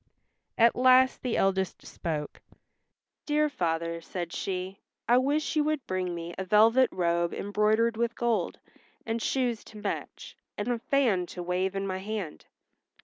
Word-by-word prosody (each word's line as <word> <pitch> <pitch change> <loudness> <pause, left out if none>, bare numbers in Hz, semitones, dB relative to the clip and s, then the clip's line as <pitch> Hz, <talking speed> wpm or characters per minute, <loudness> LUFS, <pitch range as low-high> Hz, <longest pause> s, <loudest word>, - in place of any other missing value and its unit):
At 230 0 +5
last 255 +1 +5
the 250 -3 -1
eldest 190 -1 0
spoke, 150 -3 -5 0.9
"Dear 300 0 +2
father," 170 - -2
said 175 0 -5
she, 190 +1 -4 0.3
"I 245 +1 +5
wish 290 +5 0
you 305 - +3
would 305 -4 -1
bring 185 -2 -2
me 170 0 -6
a - - -1
velvet 225 +6 +5
robe 170 -1 0
embroidered 215 +3 +1
with 235 0 0
gold, 230 -7 0 0.5
and 225 0 -2
shoes 245 -4 0
to 215 - -12
match, 210 - -5 0.2
and 205 +3 -2
a 240 -1 0
fan 225 -9 +1
to 175 +1 -7
wave 185 +2 -1
in 195 0 -2
my 190 -1 -3
hand." 200 -5 -5
205 Hz, 150 wpm, -28 LUFS, 180-240 Hz, 0.9 s, At